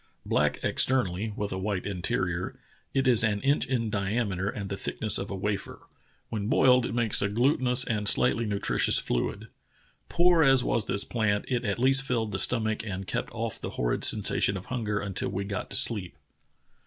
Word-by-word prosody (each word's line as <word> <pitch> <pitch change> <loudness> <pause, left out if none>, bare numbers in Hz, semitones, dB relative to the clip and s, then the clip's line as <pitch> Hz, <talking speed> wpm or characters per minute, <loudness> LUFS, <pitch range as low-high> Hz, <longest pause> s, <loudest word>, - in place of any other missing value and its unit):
Black - - +1
externally 110 -5 +1
with 105 -1 -4
a 95 - -4
white 95 -1 -3
interior, 95 -4 -3 0.3
it 135 0 0
is 120 -2 +5
an 105 -2 +1
inch 140 +2 +1
in 115 -4 -1
diameter 100 -1 -1
and 100 -2 -5
the 100 - -4
thickness 110 +2 +2
of 100 - -5
a 100 - -4
wafer. 100 +1 -4 0.5
When 105 -2 -3
boiled 125 +1 +4
it - - -5
makes 115 -3 +3
a 100 - 0
glutinous 125 +2 +2
and 105 -3 -2
slightly 115 0 +1
nutritious 100 -1 +2
fluid. - - -2 0.6
Poor 175 -1 +3
as 135 -4 +5
w^as 115 -4 -1
this 100 - +2
plant, 110 -3 -1
it 125 -2 -1
at 100 - -1
least 135 +2 +3
filled 120 -5 -2
the - - -3
stomach 110 -2 0
and 95 -3 -5
kept - - -4
off - - -5
the - - -4
horrid - - -1
sensation 100 - +3
of 95 - -9
hunger 105 -4 -2
until 100 -3 -3
we 100 +1 -3
got 100 0 -5
to - - -6
sleep. 100 -7 0
105 Hz, 185 wpm, -27 LUFS, 100-125 Hz, 0.6 s, is